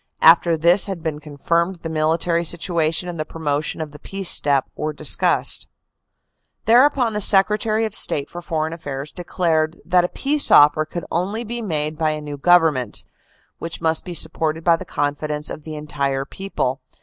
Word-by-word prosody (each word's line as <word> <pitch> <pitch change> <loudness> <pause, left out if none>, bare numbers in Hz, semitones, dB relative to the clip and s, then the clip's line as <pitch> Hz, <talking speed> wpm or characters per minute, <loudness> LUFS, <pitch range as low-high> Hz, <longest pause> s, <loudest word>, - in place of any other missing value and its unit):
After 165 0 +6
this 175 +6 +4
had 185 -5 -6
been 155 -2 -3
confirmed, 170 +5 -2
the - - -4
military 165 +2 0
situation 170 0 0
and 175 -2 -6
the - - 0
promotion 155 -1 -3
of 155 -2 -6
the 150 - -13
peace 195 +2 -3
step 140 -2 +2
were 155 0 -4
discussed. 150 0 +2 1.0
"Thereupon 245 0 +3
the 210 - -1
Secretary 215 +3 +4
of 215 - -5
State 145 -7 -1
for 175 - -9
Foreign 160 -2 -3
Affairs 145 -3 -7
de 180 - -9
clared 165 -2 -1
that 180 0 +3
a - - 0
peace 290 +1 0
offer 150 +1 +5
could 170 +2 -7
only 200 +7 -2
be 235 +1 -4
made 155 -6 -3
by 160 -1 +1
a 155 - -5
new 145 -1 -7
Govern 165 +1 +4
ment, 125 -2 -4 0.6
which 165 0 -6
must 160 -1 +1
be 175 - -7
supported 160 0 +1
by 170 -1 +4
the - - -8
confidence 150 +1 -2
of 155 - -9
the 155 -1 -7
entire 140 -2 -3
people. 135 -8 -4
160 Hz, 180 wpm, -20 LUFS, 150-180 Hz, 1.0 s, After